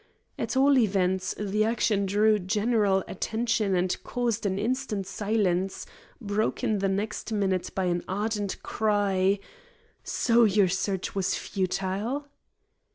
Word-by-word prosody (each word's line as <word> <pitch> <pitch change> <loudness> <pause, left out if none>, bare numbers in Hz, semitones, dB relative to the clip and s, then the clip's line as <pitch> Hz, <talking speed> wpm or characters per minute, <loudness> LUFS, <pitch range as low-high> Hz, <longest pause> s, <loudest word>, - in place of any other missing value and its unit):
At - - -2
all 275 0 +5
events, 190 -4 +1
the 210 +1 0
action 215 -3 +1
drew 210 +2 +3
general 205 0 +1
attention 220 -1 0
and 180 0 +1
caused 235 -4 -1
an 190 -1 -1
instant 225 -2 -2
silence, 195 -1 -1 0.3
broken 215 -1 -1
the 195 0 +1
next 210 +4 -3
minute 195 -4 0
by 190 - 0
an 175 -1 0
ardent 205 0 -2
cry: 200 -2 +1 0.7
"So 235 0 +3
your 200 -3 +4
search 190 +1 -2
was 195 -2 0
futile?" 195 +8 -2
205 Hz, 120 wpm, -27 LUFS, 190-220 Hz, 0.7 s, all